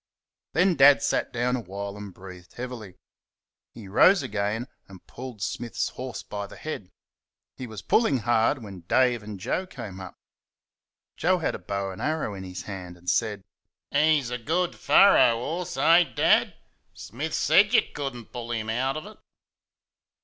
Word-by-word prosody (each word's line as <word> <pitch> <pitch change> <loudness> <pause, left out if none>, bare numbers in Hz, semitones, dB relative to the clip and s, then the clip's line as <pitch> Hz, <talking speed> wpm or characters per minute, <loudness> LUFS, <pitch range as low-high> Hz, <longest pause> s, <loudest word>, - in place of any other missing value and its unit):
Then 180 +4 +3
Dad 140 0 +6
sat - - 0
down 125 +1 0
awhile 100 -3 -6
and 105 -1 -8
breathed 90 -1 -13
heavily. 120 -6 -7 0.8
He 110 -4 -11
rose 165 - +5
again 110 +1 -2 0.2
and 95 -2 -14
pulled 125 -5 -8
Smith's 120 +3 -3
horse 130 -1 -7
by 100 -1 -6
the - - -12
head. 130 -12 -6 0.7
He 130 - -7
was 110 -2 -9
pulling 180 - +3
hard 120 +3 +1
when 100 -3 -9
Dave 125 +1 +3
and 105 -2 -8
Joe 185 - -2
came 95 - -8
up. 95 - -9 1.0
Joe 185 +3 +2
had 165 - -1
a - - -6
bow 100 +1 -3
and 95 - -9
arrow 155 -8 -1
in 95 -1 -7
his 90 -2 -7
hand, 90 -2 -8
and 90 +1 -1
said, 105 -4 -1 0.5
"He's 145 -3 +2
a 125 - -3
good 170 +8 -1
furrer 195 -11 +6
'orse, 155 +6 -4
eh, 165 +5 +6
Dad? - - +3 0.4
Smith 145 +7 -5
SAID 205 +4 +4
you - - +7
could 140 -3 -4
n't 120 -2 -11
pull 120 -2 -7
him 110 -1 -2
out 130 +5 -1
of 155 - -7
it." 215 +1 -13
120 Hz, 165 wpm, -26 LUFS, 100-145 Hz, 1.0 s, you